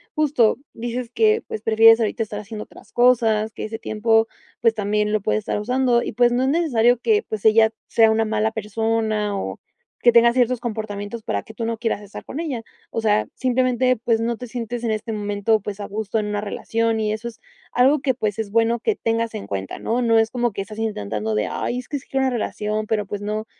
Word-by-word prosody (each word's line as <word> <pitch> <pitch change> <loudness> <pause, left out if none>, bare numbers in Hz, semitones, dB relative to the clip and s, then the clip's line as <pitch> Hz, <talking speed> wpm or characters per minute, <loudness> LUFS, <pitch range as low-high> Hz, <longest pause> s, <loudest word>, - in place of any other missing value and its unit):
justo 290 -8 +3 0.2
dices 240 +1 -4
que, 440 0 +3
pues 215 - -5
prefieres 225 +1 +6
ahorita 225 +1 0
estar 210 -1 -6
haciendo 215 +1 -7
otras - - -17
cosas, 225 -3 +3
que - - -6
ese 220 +1 -6
tiempo, 225 +1 +2 0.3
pues 230 -1 +4
también 210 0 0
lo 215 - +2
puedes 215 +1 0
estar 210 0 -3
usando 250 +1 +2
y, - - -4
pues 240 +2 +4
no 250 +2 +1
es 265 - +2
necesario 245 -7 +3
que, 420 - +2
pues, 215 -2 -5
ella 220 0 +6 0.2
sea 225 -1 +4
una 225 0 +2
mala 220 0 0
persona 220 -1 -1
o - - -4 0.4
que 240 - +5
tenga 235 0 +6
ciertos 250 -1 +2
comportamientos 215 -1 -5
para 100 - -2
que - - -13
tú 230 - -3
no 230 0 -2
quieras 225 -3 -1
estar 205 -1 -10
con 285 - -7
ella. 280 -9 -3 0.3
O 225 - -2
sea, 215 -1 +2
simplemente 255 -1 +1
pues 225 0 0
no 230 0 -1
te 250 - -7
sientes 240 0 -5
en 230 - 0
este 215 +1 -3
momento 205 +1 0
pues 205 0 -6
a 205 - -5
gusto 215 +1 -2
en 210 - -2
una 210 0 -2
relación 225 +2 -1
y 215 -1 0
eso 220 +2 -4
es 235 - -9 0.3
algo 265 +4 +4
que 265 -2 +1
pues 215 -4 -2
es 220 -2 -4
bueno 230 +1 +2
que 435 - 0
tengas 230 - -1
en 215 - -6
cuenta, 95 -1 -4
¿no? 240 +2 -1
No 230 -1 +4
es 225 0 +2
como 240 -1 0
que 195 - -3
estás 215 +2 -8
intentando 110 - -2
de 105 0 0
ay 245 - -2
es 250 - -9
que 290 - -3
es 275 - -11
que 270 - -2
una 265 -1 +2
relación 215 -2 -2
pero 210 -2 -1
pues, 205 +1 -5
no, 215 +1 -3
225 Hz, 230 wpm, -22 LUFS, 215-240 Hz, 0.4 s, prefieres